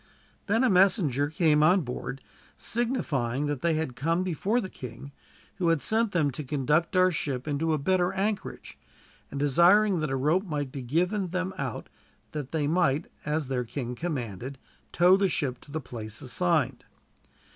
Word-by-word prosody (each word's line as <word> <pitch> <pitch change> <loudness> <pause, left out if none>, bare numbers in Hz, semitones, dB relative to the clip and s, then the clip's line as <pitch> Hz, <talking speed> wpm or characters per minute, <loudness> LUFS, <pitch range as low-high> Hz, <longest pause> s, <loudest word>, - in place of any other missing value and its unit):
Then 225 +5 +2
a - - +5
messenger 175 - +3
came 155 -1 +3
on 180 +5 +5
board, 130 0 -6 0.3
signifying 150 - -1
that 145 -3 -2
they 170 -2 +2
had 155 -6 -2
come 165 +8 0
before 190 +6 0
the 190 - -3
king, 125 -3 -9 0.5
who 180 -3 0
had 165 -2 +3
sent 220 +6 +1
them 155 -6 +1
to 145 +4 -5
conduct 150 +6 0
our 185 0 +5
ship 140 -4 -3
into 155 +2 0
a 155 - +2
better 180 +4 +1
anchorage, 195 +2 -3 0.5
and 140 - -5
desiring 175 +7 +4
that 155 -2 -1
a 135 - -1
rope 155 +9 +1
might 145 -4 -3
be 135 - -6
given 180 - 0
them 185 +2 -2
out 135 -4 -4 0.4
that 145 -4 -5
they 155 -3 0
might, 155 -1 +1 0.2
as 150 -1 0
their 125 -2 -1
king 125 +1 -5
commanded, 130 - -4 0.3
tow 180 +2 +5
the 195 -1 +2
ship 130 -6 -2
to 145 - -15
the 160 - -2
place 115 -6 -6
assigned. 140 -3 0
155 Hz, 170 wpm, -27 LUFS, 135-180 Hz, 0.5 s, a